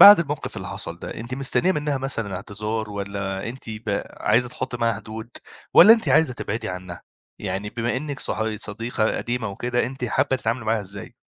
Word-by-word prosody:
بعد 205 -1 +12
الموقف 150 -3 -3
اللي - - -5
حصل - - -5
ده - - -6
أنتِ 120 +3 -5
مستنية 140 +7 +2
منها 150 -4 0
مثلًا 115 -8 -2
اعتذار 105 +2 -3
والّا 100 0 -3
أنتِ 120 -1 -7
ب 110 -2 -2
عايزة 120 +3 +3
تحطي 125 0 -4
معاها 115 -1 +2
حدود 110 +2 -7 0.4
والّا 220 - +11
أنتِ 230 - +2
عايزة 160 -6 +4
تبعدي 110 -1 -3
عنها؟ 90 -1 -6 0.4
يعني 100 +2 -3
بما 120 +2 -1
إنِك 140 0 -4
صاح 110 - 0
صديقة 110 +1 -1
قديمة 120 -2 -2
وكده 120 +4 0
أنتِ 130 0 -4
حابة 125 +3 +2
تتعاملي 115 0 -1
معاها 110 0 +2
إزاي؟ 100 0 -9
115 Hz, 180 wpm, -24 LUFS, 105-130 Hz, 0.4 s, بعد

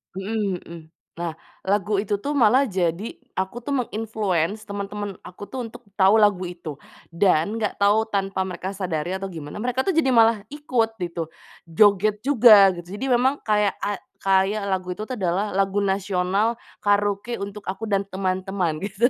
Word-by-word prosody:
Mhm 195 -1 -2
mhm. 170 0 -10 0.4
Nah, 170 -1 -3 0.3
lagu 205 +1 +1
itu 205 +1 -1
tuh 290 +3 -2
malah 255 +2 +4
jadi 180 +2 -2 0.2
aku 190 +4 -3
tuh 285 - -1
meng-influence 215 - -1
temen-temen 200 0 -5
aku 195 +3 -10
tuh 255 -2 -4
untuk 230 +2 -11 0.2
tahu 190 0 +5
lagu 200 -3 +3
itu 175 -5 -7 0.3
dan 175 +3 +2
enggak 215 -2 -1
tahu 210 +2 +4
tanpa 195 -3 -1
mereka 185 0 -5
sadari 185 -2 -3
atau 195 - -5
gimana, 160 -6 -7
mereka 250 +4 0
tuh 345 +4 -1
jadi 265 -5 +3
malah 225 -3 +4
ikut 255 -6 0
gitu. 170 -1 -3 0.4
Joget 205 +4 +3
juga 230 -6 +7
gitu. 175 +2 -9
Jadi - - -1
memang 265 +4 +1
kayak 210 -2 +2
ay 205 -1 -1 0.2
kayak 195 +2 +2
lagu 185 -1 -1
itu 215 +4 -7
tuh 255 - -3
adalah 190 +2 0
lagu 195 +1 +1
nasional 195 +2 +1 0.3
karaoke 205 +2 +1
untuk 200 +1 -6
aku 195 +4 -4
dan 200 -1 +1
teman-teman 185 -3 -2
gitu. 210 +4 +2
200 Hz, 165 wpm, -23 LUFS, 185-220 Hz, 0.4 s, juga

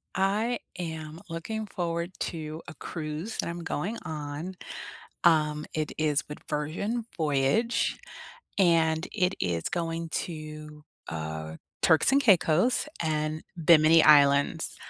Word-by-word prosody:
I 210 +5 +1 0.2
am 160 -2 -5
looking 215 +7 -4
forward 170 -2 -3
to 155 -1 -4
a 175 - -7
cruise 155 +7 -5
that - - -1
I'm 170 0 -5
going 200 +10 -2
on. 155 +2 -5 0.7
Um, 150 -2 +3
it 155 -1 -2
is 150 -2 +1
with 150 - -7
Virgin 200 +11 -2
Voyage, 150 - +1 0.6
and 165 -3 +3
it 185 -2 +1
is 85 -3 -1
going 165 -1 -2
to, 155 -2 -6 0.3
uh, 80 0 -5 0.3
Turks 160 +9 +4
and 280 +1 +4
Caicos 190 - +4 0.2
and 155 -1 -1 0.2
Bimini 160 0 +7
Islands. 140 -1 +5
160 Hz, 115 wpm, -28 LUFS, 150-180 Hz, 0.7 s, Bimini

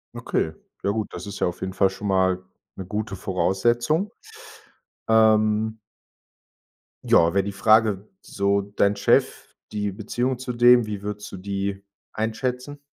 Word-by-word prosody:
Okay, 80 - -1 0.3
ja 100 - +1
gut, 110 0 -1
das - - -7
ist 100 - -7
ja - - +2
auf 90 - -6
jeden 95 0 -3
Fall 95 -1 +3
schon 100 +2 -6
mal 95 -1 +1 0.3
'ne 95 - -7
gute 105 +1 -4
Voraussetzung, 120 - 0 1.0
ähm 110 0 +3 1.2
Ja, 85 +1 +4
wäre 100 -1 +2
die 100 - -4
Frage, 105 0 +3
so 100 0 0
dein 100 0 0
Chef, - - +1 0.2
die 105 -2 -2
Beziehung 120 +5 -2
zu 125 0 -5
dem, 120 0 +5
wie 105 -2 -5
würdest 105 +1 -6
du 95 - -7
die 100 +1 -3 0.3
einschätzen? 125 +5 -3
105 Hz, 145 wpm, -24 LUFS, 95-110 Hz, 1.2 s, dem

